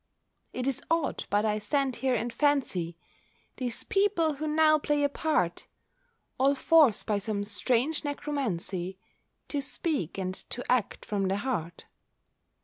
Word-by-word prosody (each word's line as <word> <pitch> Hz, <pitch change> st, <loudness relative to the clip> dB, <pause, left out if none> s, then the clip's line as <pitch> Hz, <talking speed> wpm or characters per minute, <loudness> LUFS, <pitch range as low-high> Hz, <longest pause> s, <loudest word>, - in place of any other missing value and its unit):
It 250 Hz, -, -3 dB
is 275 Hz, -2 st, -1 dB
odd, 330 Hz, -2 st, 0 dB
but 205 Hz, +2 st, +2 dB
I 215 Hz, 0 st, +1 dB
stand 265 Hz, +4 st, 0 dB
here 260 Hz, -1 st, +1 dB
and 235 Hz, +1 st, -2 dB
fancy 235 Hz, -, +1 dB, 0.6 s
These 245 Hz, -2 st, -3 dB
people 390 Hz, -6 st, +2 dB
who 310 Hz, +2 st, -3 dB
now 310 Hz, 0 st, +4 dB
play 295 Hz, 0 st, +1 dB
a 285 Hz, -, +3 dB
part, 275 Hz, -, 0 dB, 0.7 s
All 275 Hz, +2 st, +4 dB
forced 290 Hz, -6 st, +4 dB
by 210 Hz, -2 st, +1 dB
some 205 Hz, 0 st, -2 dB
strange 245 Hz, +9 st, +1 dB
necromancy 210 Hz, -, -3 dB, 0.5 s
To 285 Hz, -, -1 dB
speak, 275 Hz, -, -2 dB
and 185 Hz, -1 st, -2 dB
to 245 Hz, +5 st, -5 dB
act, 250 Hz, -5 st, 0 dB
from 200 Hz, -2 st, -1 dB
the 195 Hz, +1 st, 0 dB
heart. 205 Hz, -9 st, -3 dB
255 Hz, 140 wpm, -29 LUFS, 205-290 Hz, 0.7 s, now